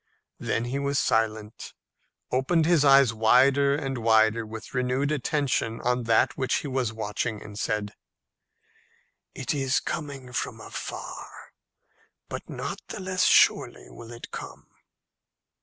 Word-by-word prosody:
Then 115 - -1
he 130 +3 -2
was 140 0 -1
silent, 110 -3 -1 0.6
opened 155 +6 +2
his 165 -3 +4
eyes 135 -4 +6
wider 130 +5 +4
and 135 -4 -3
wider 110 0 +3
with 110 0 -9
renewed 130 +3 0
attention 140 -5 -1
on 125 0 0
that 115 -1 +3
which 130 -3 0
he - - -2
was 130 -4 -1
watching, 110 0 -3
and 105 0 -9
said, 105 -2 -2 1.4
"It 130 +1 -2
is 135 -1 +1
coming 140 -5 -6
from - - -3
afar, - - -8 0.8
but - - -7
not - - -5
the - - -6
less 185 -1 0
surely - - +3
will 115 0 -11
it 120 - -10
come." - - -8
125 Hz, 130 wpm, -26 LUFS, 110-140 Hz, 1.4 s, eyes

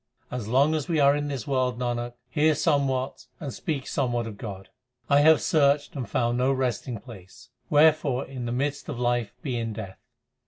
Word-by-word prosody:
As 125 -4 -4
long 135 +6 +3
as 155 -3 -2
we 165 -3 +1
are 140 0 +5
in 145 0 -2
this 135 -6 -4
world, 130 -3 0
Nanak, 120 -1 -2
hear 150 +4 +2
somewhat 135 -4 0
and 140 -5 -5
speak 145 -6 -3
somewhat 120 -4 -1
of 110 -2 -7
God. 95 -3 -8 0.4
1 140 0 +5
have 160 +1 +6
searched 145 -3 +2
and 130 -4 -4
found 120 0 0
no 130 +2 +3
resting 125 -3 -2
place; 100 -7 -13 0.2
wherefore 150 -3 +4
in 130 -2 -6
the - - -2
midst 140 +3 -2
of - - -4
life 120 -2 0
be 130 -4 -2
in 115 -1 -3
death. 100 -3 -8
130 Hz, 190 wpm, -26 LUFS, 120-145 Hz, 0.4 s, have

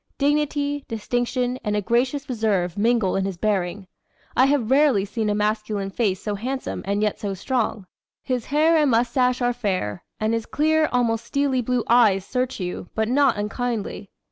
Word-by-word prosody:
Dignity, 290 0 0
distinction, 245 +2 -1
and 210 -1 -1
a 210 - +1
gracious 255 +6 0
reserve 210 -8 0
mingle 220 -2 +2
in 195 - +1
his 190 -2 -3
bearing. 195 -1 -1 0.5
I 260 - +5
have 270 -5 +1
rarely 270 -8 +4
seen 215 +1 -2
a 205 - +1
masculine 210 -1 -1
face 195 -3 0
so 210 - -3
handsome 255 +6 -4
and 200 +1 0
yet 210 - 0
so 200 -2 -3
strong. 220 -1 -2 0.4
His 250 -3 -2
hair 315 +3 +3
and 300 -3 +3
mustache 250 +1 +2
are 245 0 +2
fair, 190 - -2 0.2
and 215 +1 0
his 230 -1 -2
clear, 310 +1 +2
almost 235 -2 +1
steely 280 -2 0
blue 245 0 0
eyes 215 -6 +4
search 255 +2 -2
you, 180 -1 -5
but 220 0 0
not 265 -3 +3
unkindly. 210 -1 -3
235 Hz, 170 wpm, -23 LUFS, 205-260 Hz, 0.5 s, I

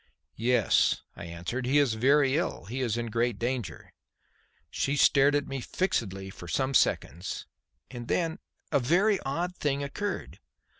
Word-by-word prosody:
"Yes," 120 -2 +2
I - - -8
answered, 90 +10 -4
"he 140 +3 +3
is 140 -6 +3
very 135 +4 +3
ill. 160 - -2
He 125 +6 -4
is 120 -3 0
in 120 -1 -3
great 120 -1 0
danger." 120 -4 -4 0.8
She 140 - 0
still 145 - +6
stared 140 +1 +4
at 145 -1 +1
me 135 -1 -4
fixedly 95 - -2
for 90 - -11
some 130 +9 0
seconds. 90 - 0 0.5
And 120 -2 -7
then 165 +1 0 0.3
a 145 - +4
very 185 - +3
odd 175 +6 -3
thing 140 -1 0
occurred. 200 +9 -4
130 Hz, 155 wpm, -28 LUFS, 115-145 Hz, 0.8 s, still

